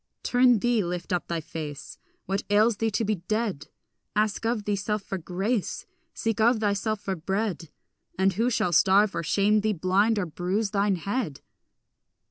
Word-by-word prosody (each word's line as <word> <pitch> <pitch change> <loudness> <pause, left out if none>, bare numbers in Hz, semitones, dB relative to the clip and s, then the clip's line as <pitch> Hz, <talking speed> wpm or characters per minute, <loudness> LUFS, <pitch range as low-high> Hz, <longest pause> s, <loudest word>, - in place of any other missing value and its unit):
Turn 245 -1 +4
thee, 235 0 +1
lift 175 +2 -4
up 180 - -1
thy 170 -1 -2
face; 150 -2 -7 0.3
What 195 +2 -1
ails 210 +2 +4
thee 225 +1 +1
to 220 +1 -1
be 210 0 0
dead? 205 -2 -2 0.5
Ask 215 +1 0
of 230 -2 -1
thyself 205 0 -1
for 195 -1 -4
grace, 190 +6 -2 0.3
Seek 225 -2 -1
of 235 +1 +4
thyself 210 0 0
for 195 -2 -2
bread, 190 -1 -2 0.5
And 190 +1 +3
who 230 +6 +1
shall 180 -7 0
starve 195 +4 +4
or - - -1
shame 205 +6 +2
thee, 215 0 +1
blind 195 +5 +2
or 200 - 0
bruise 185 +6 -2
thine 200 -1 +2
head? 195 - -3
205 Hz, 165 wpm, -26 LUFS, 185-220 Hz, 0.5 s, Turn